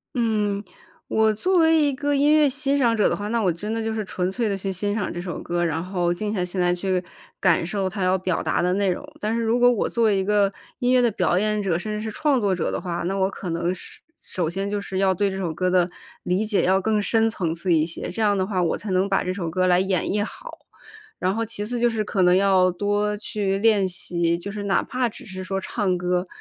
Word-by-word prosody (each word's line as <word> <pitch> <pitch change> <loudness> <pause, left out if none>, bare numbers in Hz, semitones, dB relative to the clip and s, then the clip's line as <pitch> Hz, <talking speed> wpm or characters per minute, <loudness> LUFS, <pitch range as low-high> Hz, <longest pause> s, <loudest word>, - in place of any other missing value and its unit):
嗯， 210 -4 0 0.4
我 220 0 +2
作 365 - +1
为 320 -1 +5
一 290 -1 +3
个 290 +2 -1
音 285 +1 +3
乐 305 -1 +5
欣 280 +1 0
赏 235 -4 +3
者 210 - +3
的 - - 0
话， 205 +1 -5
那 230 +1 0
我 190 -4 +2
真 205 +6 -4
的 225 0 -2
就 225 - -2
是 215 -1 -2
纯 180 -1 -2
粹 225 +4 -1
地 200 - 0
去 195 0 -3
欣 205 +2 -2
赏 210 -2 -2
这 175 - -5
首 175 -1 -5
歌， 175 0 -1
然 165 0 -1
后 180 -2 0
静 210 +4 -3
下 185 -4 -1
心 180 +1 -3
来 175 0 +3
去 185 0 -1 0.4
感 - - +3
受 190 +2 -1
它 195 0 -4
要 185 +1 +3
表 185 -2 -1
达 - - 0
的 180 +1 +1
内 195 -1 +1
容。 180 - -4 0.2
但 215 +2 -1
是 230 - 0
如 230 +2 +1
果 245 0 +6
我 235 - 0
作 235 - 0
为 215 -2 +4
一 190 - +1
个 200 0 +2 0.2
音 250 -1 +1
乐 255 -1 +5
的 240 - +3
表 190 -4 +1
演 210 0 0
者， 175 -4 0
甚 215 +4 -5
至 210 - -3
是 220 - -4
创 285 +3 +1
作 200 -4 +1
者 180 - -1
的 - - -2
话， 175 -2 -4
那 195 - -1
我 190 -1 +2
可 190 - -6
能 170 +2 -1
是 - - -12 0.2
首 175 -3 -3
先 195 +4 -3
就 205 0 -1
是 190 -1 -4
要 190 -1 +3
对 200 +2 +1
这 190 - -5
首 180 -4 -2
歌 180 +3 -1
的 180 -1 +3 0.3
理 185 +4 0
解 210 -2 +1
要 190 +1 +3
更 215 +2 +1
深 225 +2 +2
层 185 -7 -2
次 170 +2 0
一 155 -1 +4
些， 165 +1 -5
这 225 - -4
样 205 -2 +3
的 190 - +1
话， 190 -2 -1
我 170 - 0
才 205 - -6
能 185 +2 +1
把 195 - +1
这 185 - -2
首 180 -4 -3
歌 185 +3 0
来 180 -1 +4
演 190 -2 0
绎 205 0 0
好。 - - -9 0.6
然 185 +1 +1
后 225 +2 -1
其 210 -2 -4
次 240 +2 -3
就 240 0 +3
是 225 -2 -1
可 200 -2 -1
能 180 0 +5
要 190 -1 +4
多 205 +3 0
去 205 -2 -2
练 205 -3 +3
习， 175 -2 -1
就 195 +4 -6
是 205 0 -5
哪 200 -1 +1
怕 250 -1 -1
只 220 - -10
是 185 -2 -7
说 195 +1 -3
唱 190 -3 -1
歌 180 +1 -1
195 Hz, 290 characters per minute, -23 LUFS, 180-220 Hz, 0.6 s, 果